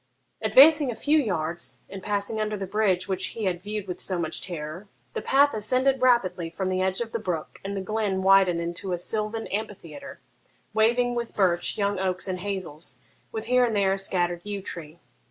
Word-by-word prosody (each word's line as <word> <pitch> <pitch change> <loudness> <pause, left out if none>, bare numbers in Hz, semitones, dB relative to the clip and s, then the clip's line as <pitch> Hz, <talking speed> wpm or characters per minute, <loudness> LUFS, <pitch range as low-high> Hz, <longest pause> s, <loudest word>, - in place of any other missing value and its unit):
Advancing 290 0 +7
a 240 - -3
few 305 +5 +3
yards, 170 - -2
and 195 - -8
passing 205 +2 -1
under 215 0 -1
the 195 - -4
bridge 190 -2 +1
which 190 -1 0
he 225 - -3
had 180 -2 -1
viewed 210 0 -4
with 180 -1 -5
so 185 - 0
much 165 -2 -2
terror, 170 +2 -6 0.3
the - - -3
path 285 +2 +4
ascended 255 +5 +1
rapidly 190 -9 +2
from 185 +3 -3
the 185 0 0
edge 190 +3 0
of 230 -1 -4
the 230 - -2
brook, 180 -7 -4
and 200 +1 -4
the - - -2
glen 200 -2 -1
widened 190 -3 +5
into 170 +2 -3
a - - 0
sylvan 215 +4 -3
amphitheatre, 210 - -6 0.5
waving 240 +3 +3
with 235 -1 -4
birch, 175 -3 +1
young 200 -2 0
oaks, 185 0 0
and 185 -1 -2
hazels, 185 -5 -5 0.3
with 220 0 -4
here 250 +1 +4
and 230 -3 +1
there 195 -1 +3
a - - -1
scattered 175 -2 +1
yew 205 -1 -4
tree. 170 -4 -6
195 Hz, 195 wpm, -26 LUFS, 180-220 Hz, 0.5 s, Advancing